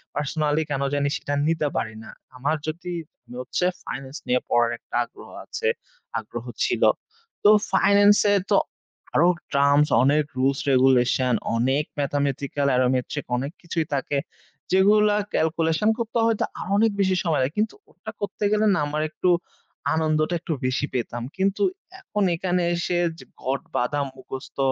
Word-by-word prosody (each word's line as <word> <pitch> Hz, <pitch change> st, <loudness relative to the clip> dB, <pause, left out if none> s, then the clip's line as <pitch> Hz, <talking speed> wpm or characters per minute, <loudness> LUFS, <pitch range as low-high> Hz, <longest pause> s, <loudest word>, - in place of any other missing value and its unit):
Personally 150 Hz, +1 st, 0 dB
কেন 140 Hz, -2 st, -1 dB
জানি 140 Hz, 0 st, +1 dB
সেটা 145 Hz, -, -4 dB
নিতে 160 Hz, -2 st, +1 dB
পারি 110 Hz, -, -2 dB
না। -, -, -11 dB, 0.3 s
আমার 145 Hz, +5 st, 0 dB
যদি 170 Hz, +3 st, -4 dB, 0.5 s
হচ্ছে 130 Hz, +7 st, -1 dB, 0.2 s
ফাইনান্স 135 Hz, +4 st, -6 dB
নিয়ে 125 Hz, 0 st, +3 dB
পড়ার 120 Hz, 0 st, +3 dB
একটা -, -, -10 dB
আগ্রহ -, -, -14 dB, 0.2 s
আছে, 460 Hz, -, -3 dB, 0.5 s
আগ্রহ -, -, -8 dB, 0.2 s
ছিল। -, -, 0 dB, 0.6 s
তো 205 Hz, -, +7 dB, 0.2 s
ফাইনান্স 205 Hz, +1 st, +5 dB, 0.2 s
এ -, -, +5 dB
তো -, -, +4 dB, 0.6 s
আরো 170 Hz, -, +5 dB, 0.3 s
টার্মস, 140 Hz, +1 st, +4 dB, 0.2 s
অনেক 150 Hz, +3 st, +4 dB
রুলস 135 Hz, +1 st, +2 dB
regulation 130 Hz, -1 st, +3 dB, 0.2 s
অনেক 130 Hz, +5 st, +2 dB, 0.2 s
mathematical 140 Hz, 0 st, -1 dB
aromatric 130 Hz, +3 st, 0 dB
অনেক 140 Hz, +3 st, -3 dB
কিছুই 165 Hz, -2 st, -2 dB
থাকে, 140 Hz, +1 st, -1 dB, 0.5 s
যেগুলা 205 Hz, +2 st, +5 dB, 0.2 s
calculation 165 Hz, +5 st, +1 dB
করতে 235 Hz, 0 st, -2 dB
হয়তো 225 Hz, -2 st, +1 dB, 0.2 s
আরো -, -, -6 dB
অনেক 220 Hz, +1 st, +4 dB
বেশি 190 Hz, -1 st, +2 dB
সময় 160 Hz, -5 st, +1 dB
লাগে। 130 Hz, +3 st, 0 dB
কিন্তু 215 Hz, +1 st, 0 dB, 0.2 s
ওটা -, -, -9 dB
করতে 205 Hz, +1 st, -4 dB
গেলে 215 Hz, 0 st, +3 dB
না, 180 Hz, -, +1 dB
আমার 150 Hz, +1 st, -2 dB
একটু 180 Hz, +3 st, 0 dB, 0.7 s
আনন্দটা 155 Hz, +1 st, +1 dB
একটু 165 Hz, 0 st, -3 dB
বেশি 130 Hz, +3 st, 0 dB
পেতাম 120 Hz, -1 st, -3 dB
কিন্তু 195 Hz, -, 0 dB, 0.4 s
এখন 210 Hz, -, -2 dB
এখানে 180 Hz, +1 st, 0 dB
এসে 175 Hz, +1 st, -1 dB, 0.2 s
যে -, -, -12 dB, 0.2 s
ঘট 135 Hz, +1 st, -1 dB
বাঁধা 145 Hz, +4 st, 0 dB
মুখস্থ, 130 Hz, 0 st, -9 dB
150 Hz, 150 wpm, -24 LUFS, 135-180 Hz, 0.7 s, তো